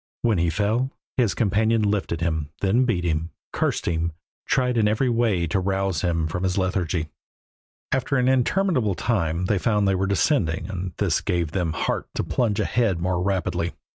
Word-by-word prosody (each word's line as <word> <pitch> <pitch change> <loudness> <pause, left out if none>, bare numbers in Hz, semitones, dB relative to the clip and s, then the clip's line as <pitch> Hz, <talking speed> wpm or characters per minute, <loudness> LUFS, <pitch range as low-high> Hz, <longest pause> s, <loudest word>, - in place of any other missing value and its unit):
When 110 -6 +2
he 85 0 +2
fell 110 +8 0 0.3
his 120 -6 +2
companion 110 +1 +2
lifted 100 -5 -1
him, 80 -3 -1
then 110 +6 +3
beat 100 -8 0
him, 80 -1 -1 0.2
cursed - - 0
him, 85 0 -1 0.3
tried 125 -2 +1
in 110 -2 +3
every 110 +5 +1
way 115 -7 +1
to 85 +4 0
rouse 95 -3 0
him 85 -3 0
from 85 +3 -3
his 95 0 0
lethargy. 90 -4 -1 0.8
After 135 +1 +1
an 125 0 +2
interminable 130 - +2
time 90 -5 0
they 100 +1 +1
found 105 -1 +2
they 95 - +3
were 95 +1 0
descending 100 - +1
and 90 -1 -4
this 95 -6 +1
gave 85 -5 -1
them 85 -3 -1
heart - - -2
to - - 0
plunge 115 -5 0
ahead 110 -8 +1
more 90 0 0
rapidly. 90 -3 -1
95 Hz, 175 wpm, -24 LUFS, 85-115 Hz, 0.8 s, then